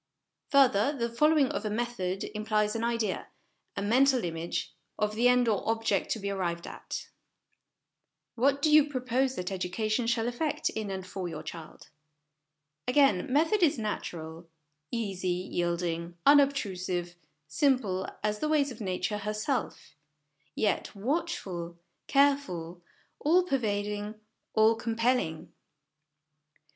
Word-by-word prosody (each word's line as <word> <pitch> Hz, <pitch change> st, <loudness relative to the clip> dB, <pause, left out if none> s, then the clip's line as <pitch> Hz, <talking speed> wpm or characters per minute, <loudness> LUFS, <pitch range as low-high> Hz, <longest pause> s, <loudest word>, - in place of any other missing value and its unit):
Further, 275 Hz, -1 st, +4 dB
the 235 Hz, -1 st, -1 dB
following 300 Hz, +2 st, +4 dB
of -, -, -3 dB
a 215 Hz, -, -1 dB
method 210 Hz, -4 st, -2 dB
implies 215 Hz, 0 st, 0 dB
an 225 Hz, -, -2 dB
idea, 230 Hz, -4 st, -1 dB, 0.5 s
a 200 Hz, -, -1 dB
mental 255 Hz, +4 st, +4 dB
image, 165 Hz, 0 st, -3 dB, 0.2 s
of 210 Hz, 0 st, 0 dB
the 235 Hz, +3 st, +3 dB
end 250 Hz, -1 st, +4 dB
or 215 Hz, -3 st, +2 dB
object 225 Hz, -3 st, 0 dB
to 225 Hz, -, -6 dB
be 200 Hz, 0 st, -3 dB
arrived 175 Hz, -3 st, -2 dB
at. -, -, -7 dB, 1.3 s
What 275 Hz, +3 st, +1 dB
do 310 Hz, -, +4 dB
you 300 Hz, -1 st, +6 dB
propose 255 Hz, 0 st, 0 dB
that 180 Hz, -2 st, -3 dB
educa 190 Hz, +3 st, -2 dB
tion 230 Hz, +2 st, +1 dB
shall 230 Hz, -1 st, +1 dB
effect 275 Hz, +5 st, -1 dB
in 215 Hz, -2 st, -4 dB
and 190 Hz, -1 st, -4 dB
for 185 Hz, 0 st, -5 dB
your 160 Hz, -2 st, -6 dB
child? 160 Hz, -2 st, -10 dB, 1.0 s
Again, 255 Hz, -6 st, +3 dB
method 325 Hz, +9 st, +3 dB
is 315 Hz, -6 st, +4 dB
natural; 170 Hz, -6 st, -5 dB, 0.4 s
easy, 200 Hz, -6 st, -3 dB
yielding, 175 Hz, -1 st, -2 dB
unobtrusive, 190 Hz, -12 st, +2 dB, 0.3 s
simple 220 Hz, -, +1 dB
as 210 Hz, 0 st, 0 dB
the 305 Hz, -, -1 dB
ways 290 Hz, -3 st, +2 dB
of 235 Hz, -1 st, -9 dB
Nature 190 Hz, +1 st, -2 dB
herself; 210 Hz, +6 st, -3 dB, 0.6 s
yet, 210 Hz, 0 st, 0 dB
watchful, 195 Hz, -, -3 dB, 0.3 s
careful, 275 Hz, -, +1 dB, 0.4 s
all 345 Hz, +5 st, +4 dB
pervading, 210 Hz, -, -2 dB, 0.4 s
all 220 Hz, +1 st, +6 dB
compelling. 230 Hz, -7 st, -1 dB
215 Hz, 125 wpm, -29 LUFS, 185-260 Hz, 1.3 s, you